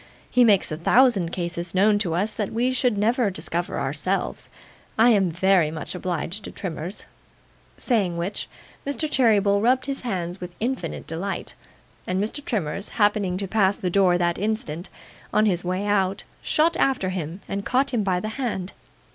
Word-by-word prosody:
He 250 Hz, -, +5 dB
makes 205 Hz, -8 st, +4 dB
a 155 Hz, -, -2 dB
thousand 200 Hz, -1 st, +4 dB
cases 170 Hz, 0 st, -4 dB
known 205 Hz, +2 st, +4 dB
to 175 Hz, -6 st, -1 dB
us 205 Hz, +5 st, +1 dB
that 210 Hz, -3 st, -3 dB
we 240 Hz, +3 st, +1 dB
should 250 Hz, -4 st, +1 dB
never 225 Hz, +2 st, +2 dB
discover 170 Hz, 0 st, -3 dB
of -, -, -1 dB
ourselves. 150 Hz, +8 st, -2 dB, 0.5 s
I 230 Hz, +2 st, +6 dB
am 195 Hz, -5 st, +3 dB
VERY 180 Hz, -1 st, +3 dB
much 155 Hz, -2 st, -5 dB
obliged 180 Hz, +2 st, -3 dB
to -, -, -7 dB
Trimmers.' 175 Hz, +1 st, -6 dB, 0.7 s
Saying 200 Hz, -9 st, +1 dB
which, 175 Hz, +4 st, -3 dB, 0.3 s
Mr. 285 Hz, +3 st, -2 dB
Cheeryble 210 Hz, -7 st, +3 dB
rubbed 250 Hz, +3 st, +3 dB
his 275 Hz, 0 st, -1 dB
hands 185 Hz, -6 st, -3 dB
with 180 Hz, -1 st, -7 dB
infinite 235 Hz, -, -3 dB
delight, 175 Hz, +5 st, -4 dB, 0.5 s
and 185 Hz, +1 st, 0 dB
Mr. 220 Hz, +8 st, -2 dB
Trimmers 200 Hz, -, -2 dB
happening 205 Hz, -4 st, +1 dB
to 195 Hz, 0 st, -1 dB
pass 200 Hz, -1 st, +2 dB
the 180 Hz, -, -3 dB
door 185 Hz, -2 st, +4 dB
that 175 Hz, -1 st, 0 dB
instant, 195 Hz, -6 st, -2 dB, 0.4 s
on 215 Hz, -, +3 dB
his 180 Hz, -4 st, +1 dB
way 185 Hz, +3 st, -2 dB
out, 195 Hz, -1 st, +1 dB, 0.2 s
shot 330 Hz, +2 st, +2 dB
out -, -, +4 dB
after 255 Hz, -9 st, +1 dB
him 180 Hz, 0 st, -4 dB
and 200 Hz, 0 st, -3 dB
caught 260 Hz, +5 st, +1 dB
him 235 Hz, -, +2 dB
by 185 Hz, -3 st, +1 dB
the 215 Hz, -, -4 dB
hand. 220 Hz, -6 st, -3 dB
195 Hz, 175 wpm, -24 LUFS, 175-220 Hz, 0.7 s, I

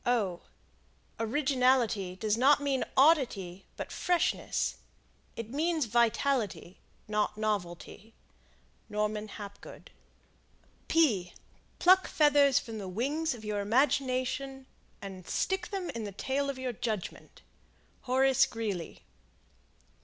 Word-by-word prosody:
Originality 250 Hz, -6 st, +1 dB
does 210 Hz, +2 st, 0 dB
not 275 Hz, +5 st, +5 dB
mean 280 Hz, -2 st, 0 dB
oddity, 240 Hz, -, +3 dB
but -, -, -6 dB
freshness. 355 Hz, -1 st, 0 dB, 0.6 s
It 230 Hz, 0 st, -6 dB
means 315 Hz, +1 st, 0 dB
vitality, 235 Hz, -4 st, 0 dB, 0.3 s
not 210 Hz, 0 st, 0 dB
novelty. 210 Hz, 0 st, -4 dB, 0.7 s
Norman 210 Hz, 0 st, -2 dB
Hapgood. 200 Hz, -1 st, -10 dB, 1.9 s
Pluck 370 Hz, +1 st, +5 dB
feathers 290 Hz, -3 st, +4 dB
from 225 Hz, -3 st, -3 dB
the 195 Hz, -, -6 dB
wings 280 Hz, -, -1 dB
of 220 Hz, -2 st, -11 dB
your 210 Hz, -1 st, -2 dB
imagination, 260 Hz, +3 st, 0 dB, 0.4 s
and 190 Hz, -3 st, -8 dB
stick 380 Hz, -2 st, -1 dB
them 385 Hz, -3 st, -4 dB
in 230 Hz, -, -5 dB
the 205 Hz, -, -5 dB
tail 270 Hz, +8 st, -2 dB
of 275 Hz, -, -3 dB
your 260 Hz, -1 st, -3 dB
judgment. 220 Hz, -4 st, -5 dB, 0.6 s
Horace 265 Hz, 0 st, +3 dB
Greeley. 205 Hz, -7 st, -5 dB
240 Hz, 100 wpm, -30 LUFS, 210-275 Hz, 1.9 s, not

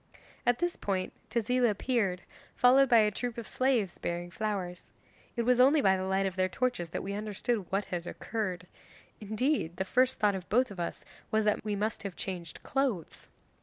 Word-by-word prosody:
'At 245 Hz, 0 st, +4 dB
this 350 Hz, 0 st, -1 dB
point 190 Hz, -2 st, -2 dB, 0.2 s
Tezila 240 Hz, +1 st, +2 dB
appeared, 205 Hz, -4 st, 0 dB, 0.3 s
followed 265 Hz, +2 st, +6 dB
by 235 Hz, -, +7 dB
a 210 Hz, 0 st, +3 dB
troop 240 Hz, +3 st, -4 dB
of 235 Hz, -, -5 dB
slaves 250 Hz, -8 st, +1 dB
bearing 175 Hz, 0 st, -3 dB
flowers. 190 Hz, -4 st, -4 dB, 0.4 s
It 235 Hz, -, 0 dB
was 250 Hz, +1 st, +3 dB
only 275 Hz, +5 st, +6 dB
by 190 Hz, -8 st, +4 dB
the 185 Hz, 0 st, -2 dB
light 190 Hz, +1 st, +1 dB
of 190 Hz, -1 st, -2 dB
their 185 Hz, 0 st, +1 dB
torches 240 Hz, -6 st, -1 dB
that -, -, -4 dB
we 200 Hz, -, -4 dB
understood 210 Hz, 0 st, -2 dB
what 195 Hz, +1 st, 0 dB
had 175 Hz, -1 st, -4 dB
occurred. 185 Hz, -5 st, -3 dB, 0.5 s
Indeed 215 Hz, -, -1 dB
the 190 Hz, -, -1 dB
first 255 Hz, +5 st, +2 dB
thought 210 Hz, -1 st, +3 dB
of 185 Hz, -2 st, -6 dB
both 250 Hz, +2 st, +3 dB
of 190 Hz, -, -8 dB
us 170 Hz, -, -4 dB, 0.2 s
was 220 Hz, 0 st, +1 dB
that 210 Hz, -, +1 dB
we 210 Hz, -1 st, -1 dB
must 210 Hz, +2 st, -2 dB
have 200 Hz, -3 st, -5 dB
changed 175 Hz, -4 st, -6 dB
clothes. 255 Hz, -, -2 dB
210 Hz, 190 wpm, -30 LUFS, 185-245 Hz, 0.5 s, by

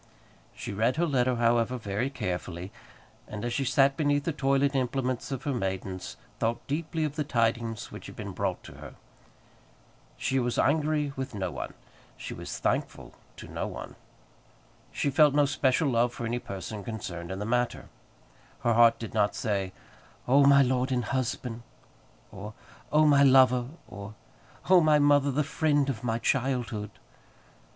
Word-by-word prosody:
She -, -, -6 dB
read 115 Hz, +5 st, +1 dB
her 170 Hz, +3 st, +1 dB
letter, 130 Hz, -5 st, +1 dB
however, 120 Hz, +1 st, +2 dB
very 105 Hz, +3 st, -2 dB
carefully, 90 Hz, -6 st, -4 dB, 0.6 s
and 105 Hz, +2 st, -6 dB
as 120 Hz, -, -2 dB
she 135 Hz, +2 st, 0 dB
sat 135 Hz, +2 st, +3 dB
beneath 145 Hz, -1 st, +1 dB
the 165 Hz, -, -1 dB
toilet 140 Hz, -1 st, +1 dB
implements 130 Hz, -1 st, -1 dB
of 135 Hz, -, -4 dB
her 145 Hz, -, -1 dB
maidens 95 Hz, -4 st, -4 dB, 0.2 s
thought 115 Hz, +1 st, -1 dB
deeply 160 Hz, +2 st, -2 dB
of 150 Hz, 0 st, -3 dB
the 150 Hz, -, +1 dB
tidings 115 Hz, -4 st, -1 dB
which -, -, -9 dB
had -, -, -10 dB
been -, -, -6 dB
brought -, -, -2 dB
to -, -, -11 dB
her. -, -, -10 dB, 1.2 s
She 130 Hz, +1 st, 0 dB
was 120 Hz, -1 st, -1 dB
angry 150 Hz, 0 st, +1 dB
with 130 Hz, -3 st, -5 dB
no 95 Hz, -3 st, -2 dB
one; 65 Hz, -, -6 dB, 0.4 s
she -, -, -6 dB
was -, -, -6 dB
thankful -, -, -2 dB, 0.2 s
to -, -, -9 dB
no -, -, -4 dB
one. -, -, -8 dB, 1.0 s
She 140 Hz, -, -1 dB
felt 145 Hz, +1 st, +5 dB
no 145 Hz, -1 st, +5 dB
special 135 Hz, +1 st, +1 dB
love 120 Hz, -1 st, +2 dB
for 120 Hz, -, -4 dB
any 120 Hz, +2 st, -1 dB
person 100 Hz, 0 st, -7 dB
concerned 90 Hz, -6 st, -6 dB
in 95 Hz, -, -4 dB
the 105 Hz, -, -4 dB
matter. 120 Hz, +2 st, -1 dB, 0.7 s
Her 120 Hz, -, +2 dB
heart 115 Hz, 0 st, +6 dB
did 115 Hz, -, -7 dB
not 105 Hz, -2 st, +1 dB
say, 100 Hz, -3 st, -1 dB, 0.6 s
"Oh, 140 Hz, +2 st, +5 dB
my 140 Hz, 0 st, +7 dB
lord 130 Hz, +1 st, 0 dB
and 125 Hz, -2 st, 0 dB
husband!" 125 Hz, -2 st, -2 dB, 0.7 s
or, 105 Hz, +2 st, -8 dB, 0.4 s
"Oh, 155 Hz, +1 st, +5 dB
my 145 Hz, -2 st, +5 dB
lover!" 130 Hz, -2 st, +5 dB, 0.2 s
or, 100 Hz, +1 st, -9 dB, 0.5 s
"Oh, 185 Hz, -1 st, +7 dB
my 155 Hz, -1 st, +5 dB
mother, 145 Hz, -1 st, +4 dB
the 145 Hz, +3 st, +1 dB
friend 140 Hz, +1 st, +1 dB
of 120 Hz, -2 st, -8 dB
my 115 Hz, -2 st, 0 dB
childhood!" 120 Hz, -5 st, -1 dB
125 Hz, 165 wpm, -28 LUFS, 115-140 Hz, 1.2 s, my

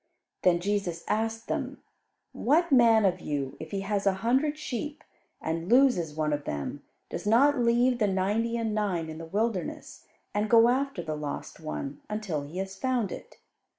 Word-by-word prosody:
Then 175 Hz, -2 st, +4 dB
Jesus 185 Hz, -3 st, -2 dB
asked 225 Hz, +1 st, -1 dB
them, -, -, -3 dB, 0.5 s
"What 320 Hz, +6 st, +2 dB
man 230 Hz, -4 st, +6 dB
of 185 Hz, -2 st, +2 dB
you, 140 Hz, -2 st, -3 dB
if 160 Hz, -, -7 dB
he 195 Hz, +2 st, -3 dB
has 200 Hz, 0 st, -1 dB
a 195 Hz, -, +4 dB
hundred 280 Hz, +5 st, +2 dB
sheep, 295 Hz, +2 st, -5 dB, 0.4 s
and 165 Hz, +2 st, -3 dB
loses 240 Hz, -, +4 dB
one 155 Hz, -1 st, 0 dB
of 145 Hz, 0 st, -3 dB
them, 70 Hz, -1 st, -4 dB, 0.3 s
does -, -, -4 dB
not 270 Hz, +6 st, +5 dB
leave 240 Hz, +1 st, +3 dB
the 210 Hz, -, +3 dB
ninety 205 Hz, +5 st, 0 dB
and 225 Hz, -2 st, -1 dB
nine 190 Hz, -6 st, -1 dB
in 160 Hz, 0 st, -7 dB
the 165 Hz, -, -6 dB
wilderness, 205 Hz, 0 st, -3 dB, 0.3 s
and 210 Hz, +1 st, 0 dB
go 230 Hz, 0 st, +7 dB
after 265 Hz, -7 st, 0 dB
the 155 Hz, -2 st, -3 dB
lost 150 Hz, -1 st, -6 dB
one, 145 Hz, -3 st, -5 dB
until 210 Hz, -8 st, -2 dB
he 145 Hz, +5 st, -8 dB
has 190 Hz, 0 st, -4 dB
found 245 Hz, -2 st, 0 dB
it? -, -, -9 dB
210 Hz, 175 wpm, -28 LUFS, 170-235 Hz, 0.5 s, go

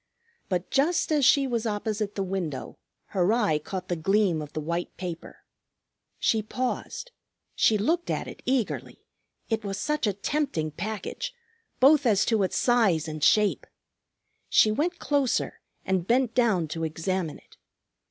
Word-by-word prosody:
But 180 Hz, -2 st, -2 dB
just 310 Hz, +5 st, +2 dB
as 295 Hz, -3 st, +3 dB
she 275 Hz, +2 st, +5 dB
was 235 Hz, -3 st, -1 dB
opposite 210 Hz, -1 st, -2 dB
the 195 Hz, -, -1 dB
window, 180 Hz, -7 st, -4 dB, 0.3 s
her 190 Hz, 0 st, +2 dB
eye 210 Hz, -10 st, +2 dB
caught 185 Hz, +4 st, -6 dB
the 175 Hz, -, -1 dB
gleam 185 Hz, 0 st, +2 dB
of 150 Hz, -1 st, -8 dB
the -, -, -2 dB
white 170 Hz, +3 st, -3 dB
paper. 175 Hz, -3 st, -7 dB, 0.7 s
She 220 Hz, -, +2 dB
paused. 255 Hz, -, -4 dB, 0.4 s
She 220 Hz, -, +3 dB
looked 330 Hz, +12 st, 0 dB
at -, -, -2 dB
it -, -, -9 dB
eagerly; 255 Hz, -4 st, -2 dB, 0.4 s
it 225 Hz, -1 st, -1 dB
was 195 Hz, -1 st, -3 dB
such 300 Hz, +3 st, 0 dB
a 205 Hz, -, +1 dB
tempting 200 Hz, -, -1 dB
package, 220 Hz, -, -5 dB, 0.4 s
both 280 Hz, +1 st, +6 dB
as 205 Hz, -3 st, +3 dB
to 220 Hz, -3 st, +2 dB
its 190 Hz, -, 0 dB
size 200 Hz, -11 st, +3 dB
and 155 Hz, -1 st, -5 dB
shape! 210 Hz, +2 st, +3 dB, 0.8 s
She 215 Hz, -, +5 dB
went 335 Hz, +10 st, 0 dB
closer 285 Hz, -6 st, 0 dB, 0.2 s
and 185 Hz, -2 st, 0 dB
bent 245 Hz, 0 st, +2 dB
down 220 Hz, -10 st, +2 dB
to 165 Hz, +1 st, -4 dB
examine 165 Hz, +1 st, -2 dB
it. -, -, -22 dB
210 Hz, 150 wpm, -27 LUFS, 180-250 Hz, 0.8 s, both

